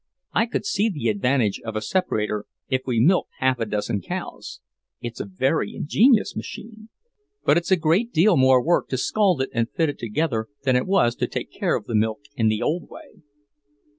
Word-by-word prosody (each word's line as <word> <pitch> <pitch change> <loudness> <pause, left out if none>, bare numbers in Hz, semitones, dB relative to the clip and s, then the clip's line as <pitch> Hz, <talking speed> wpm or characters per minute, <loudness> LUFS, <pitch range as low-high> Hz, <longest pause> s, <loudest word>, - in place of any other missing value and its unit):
I 225 - +2
could 225 - -3
see 200 +2 +1
the 145 - -2
advantage 110 0 +1
of 110 -1 -6
a 110 - -1
separator 105 - -1 0.2
if 130 -1 +1
we 120 -3 +1
milked 175 +10 +3
half 130 -1 +1
a 115 - -1
dozen 105 0 -2
cows. - - -6 0.4
It's 120 -1 -7
a - - -3
very 130 - -1
ingenious 220 - +3
machine. 220 0 -8 0.6
But 150 - +5
it's 170 - -2
a 190 - +6
great 175 +9 +1
deal 175 +4 +4
more 130 -2 +4
work 170 +1 +2
to 130 - -2
scald 185 +1 +2
it - - -6
and 115 0 0
fit 160 -2 0
it 145 - -6
together 115 -1 -1 0.2
than 130 -2 +2
it 125 - +1
was 185 -12 +3
to - - 0
take - - -5
care - - 0
of - - -4
the - - -6
milk 110 +2 +1
in 115 -4 +2
the 110 0 +1
old 165 +3 -2
way." 205 - -14
130 Hz, 200 wpm, -23 LUFS, 115-180 Hz, 0.6 s, a